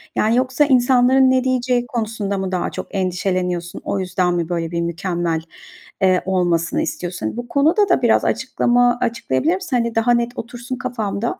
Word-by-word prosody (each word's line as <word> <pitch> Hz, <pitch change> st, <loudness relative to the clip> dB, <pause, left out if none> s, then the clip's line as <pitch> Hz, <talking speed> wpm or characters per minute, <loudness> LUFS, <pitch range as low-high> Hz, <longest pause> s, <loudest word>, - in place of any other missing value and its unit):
Yani, 220 Hz, +2 st, +2 dB
yoksa 260 Hz, +3 st, +2 dB
insanların 260 Hz, 0 st, +4 dB
ne 255 Hz, -1 st, +2 dB
diyeceği 250 Hz, -1 st, 0 dB
konusunda 220 Hz, -4 st, -3 dB
mı 190 Hz, -1 st, -3 dB
daha 180 Hz, -1 st, -1 dB
çok -, -, -6 dB
endişeleniyorsun? 180 Hz, -2 st, -2 dB
O 195 Hz, -, -2 dB
yüzden 180 Hz, -1 st, 0 dB
mi 170 Hz, -1 st, -2 dB
böyle 170 Hz, -1 st, -2 dB
bir 170 Hz, 0 st, -1 dB
mükemmel, 170 Hz, -1 st, -2 dB, 0.6 s
eee, 185 Hz, -1 st, +3 dB
olmasını 175 Hz, -3 st, 0 dB
istiyorsun? 175 Hz, 0 st, -4 dB
Hani, -, -, -3 dB
bu 240 Hz, 0 st, -5 dB
konuda 325 Hz, -, +2 dB
da 355 Hz, -, +3 dB
biraz 235 Hz, -2 st, +3 dB
açıklama 245 Hz, 0 st, +2 dB
açıklayabilir 240 Hz, -, 0 dB
misin? 365 Hz, -8 st, -4 dB
Hani 235 Hz, -1 st, -1 dB
daha 225 Hz, +2 st, +2 dB
net 235 Hz, 0 st, 0 dB
otursun 245 Hz, +2 st, -6 dB
kafamda. 225 Hz, -3 st, -3 dB
225 Hz, 170 wpm, -20 LUFS, 180-250 Hz, 0.6 s, insanların